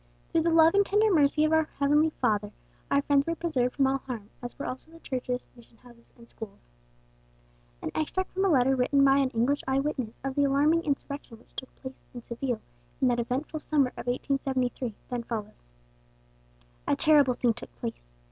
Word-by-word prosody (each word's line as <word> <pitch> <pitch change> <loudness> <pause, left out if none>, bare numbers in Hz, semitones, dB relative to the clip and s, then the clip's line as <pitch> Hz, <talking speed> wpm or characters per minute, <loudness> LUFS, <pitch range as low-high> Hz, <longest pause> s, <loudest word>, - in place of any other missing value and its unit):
Through 330 - +3
the 335 - +2
love 325 0 +6
and 400 0 +5
tender 415 +1 +3
mercy 300 -1 +4
of 310 - +1
our 320 -1 +3
Heavenly 295 +3 +3
Father, 210 -8 -1 0.4
our 280 0 +2
friends 285 0 +2
were 335 - 0
preserved 270 -8 -1
from 275 - +3
all 270 +1 +1
harm, 230 -6 -7
as 245 0 -7
were 285 - -5
also 260 +5 -6
the 330 0 -15
churches, 250 -3 -3
mission 235 -1 -19
houses, 240 -1 -16
and 235 0 -16
schools." 200 - -9 1.1
An - - -3
extract 375 +4 -2
from 380 - -1
a 390 - +3
letter 265 -3 +4
written 275 +2 +3
by 270 0 +5
an 275 -2 +2
English 255 +4 +1
eye 265 0 +2
witness 265 -6 -3
of 270 -1 -2
the 285 - +2
alarming 295 +5 +3
insurrection 280 -4 -4
which 230 - -25
took 260 - -6
place 260 0 -6 0.2
in 240 - -7
Seville 235 -1 -3 0.4
in 260 - +3
that 240 -1 +1
eventful 265 +7 -2
summer 290 -4 +2
of - - -10
1873 255 -2 -1 0.2
then 245 -1 -1
follows. 215 - -7 1.2
"A - - +3
terrible 285 - +4
scene 240 -2 +2
took - - -9
place. - - -7
270 Hz, 195 wpm, -28 LUFS, 245-300 Hz, 1.2 s, love